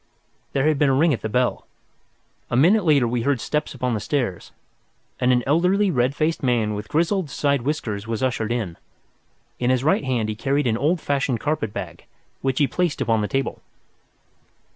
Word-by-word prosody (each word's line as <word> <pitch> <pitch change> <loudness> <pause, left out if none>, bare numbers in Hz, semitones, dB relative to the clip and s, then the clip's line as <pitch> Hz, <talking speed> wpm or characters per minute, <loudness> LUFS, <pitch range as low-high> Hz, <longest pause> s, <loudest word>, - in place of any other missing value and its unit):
There 140 +2 +2
had 155 -3 +2
been 145 - +4
a 135 - +3
ring 155 +3 +3
at 120 - -3
the 110 - -3
bell. 125 +3 0 0.8
A - - -1
minute 185 - +4
later 140 -6 +4
we 120 0 -1
heard 135 +1 +1
steps 150 +3 -2
upon 125 -1 -1
the 110 - -1
stairs, 120 - -2 0.7
and 125 0 +3
an 125 -1 +2
elderly 180 +7 +2
red 130 -1 +1
faced 160 +2 0
man 120 -5 +1
with 105 +1 -5
grizzled 170 +2 0
side 140 -2 0
whiskers 115 -7 -3
was 115 +1 -2
ushered 115 -3 -1
in. 110 -9 -2 0.8
In 125 - +1
his 130 0 +2
right 155 +1 +2
hand 125 -5 0
he 110 - -2
carried 140 +5 0
an 115 -3 +2
old 150 +9 +1
fashioned 135 -4 0
carpet 145 -7 -1
bag, - - -7 0.4
which 135 -1 -1
he 145 - +4
placed 170 +5 -1
upon 115 -2 +1
the 105 - -1
table. 135 0 -2
130 Hz, 190 wpm, -23 LUFS, 115-150 Hz, 0.8 s, been